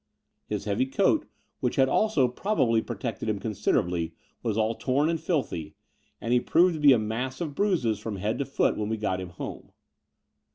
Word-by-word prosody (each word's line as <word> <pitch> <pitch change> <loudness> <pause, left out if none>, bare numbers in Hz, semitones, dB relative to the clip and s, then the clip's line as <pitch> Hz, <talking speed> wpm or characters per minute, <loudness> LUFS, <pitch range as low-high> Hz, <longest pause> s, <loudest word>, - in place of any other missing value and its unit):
His 105 -1 -3
heavy 110 +5 +1
coat, 135 - +2 0.3
which - - -1
had 135 - +4
also 180 -5 +3
probably 125 - +1
protected 110 -1 -4
him 105 - 0
considerably, 90 -5 -1 0.3
was 110 -3 -1
all 110 +1 +2
torn 140 +6 +1
and 165 -1 -1
filthy: 85 - -2 0.4
and 115 - -1
he 125 - +5
proved 175 +7 +4
to 155 - -4
be 145 -1 +7
a 130 - +6
ntiass 115 +5 -3
of 155 -4 -3
bruises 140 - +1
from 105 -1 -4
head 105 +3 -2
to 140 - 0
foot 140 - +1
when 105 0 -2
we 110 - -1
got 95 -3 -1
him 90 - -6
home. 90 - -8
115 Hz, 190 wpm, -27 LUFS, 105-140 Hz, 0.4 s, be